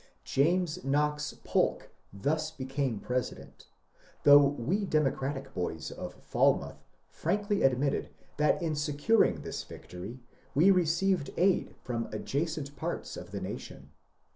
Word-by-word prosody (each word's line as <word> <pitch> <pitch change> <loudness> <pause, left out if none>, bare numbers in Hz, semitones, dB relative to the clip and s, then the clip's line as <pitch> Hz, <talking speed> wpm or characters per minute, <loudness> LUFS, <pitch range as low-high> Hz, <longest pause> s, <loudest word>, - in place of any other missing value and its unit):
James 165 +2 +1
Knox 150 +2 0
Polk - - 0 0.2
thus 155 +10 -1
became 135 -5 -2
President, 125 +2 -4 0.6
though 145 0 +9
we 145 - 0
Democratic 140 -5 -1
boys 80 -3 -3
of - - -7
Falmouth - - +1 0.2
frankly 205 0 -1
admitted 135 +2 +2 0.3
that 150 0 +3
in 160 -2 0
securing 150 +9 +2
this - - -4
victory 95 +8 -9 0.4
we 170 +8 +6
received 180 -2 +2
aid 185 +2 +2
from 115 -2 -2
adjacent 145 -1 -3
parts 130 - -4
of - - -8
the - - -4
nation. - - -7
145 Hz, 115 wpm, -30 LUFS, 135-165 Hz, 0.6 s, though